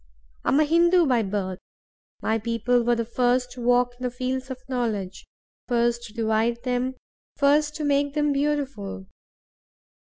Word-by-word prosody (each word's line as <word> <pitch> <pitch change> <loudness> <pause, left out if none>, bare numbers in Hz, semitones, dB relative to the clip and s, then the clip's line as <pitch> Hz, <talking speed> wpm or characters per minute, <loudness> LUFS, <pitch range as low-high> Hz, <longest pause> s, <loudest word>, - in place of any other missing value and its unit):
I - - 0
am 275 - +4
a - - +6
Hindoo 340 +3 +4
by 250 -5 +3
birth. 190 -2 -3 0.6
My 220 +1 +1
people 235 +2 +1
were 240 0 +2
the 230 -1 -2
first 245 +1 +1
to 245 0 -9
walk 245 0 +3
in - - -8
the 250 - 0
fields 255 +2 -3
of 260 - -5
knowledge, 215 -7 -3 0.4
first 240 -1 +1
to 215 - -12
divide 225 +1 0
them, 250 +1 -1 0.4
first 295 +1 +3
to 310 - -4
make 285 0 +1
them 295 -1 +2
beautiful. 275 -9 -2
245 Hz, 160 wpm, -25 LUFS, 230-280 Hz, 0.6 s, a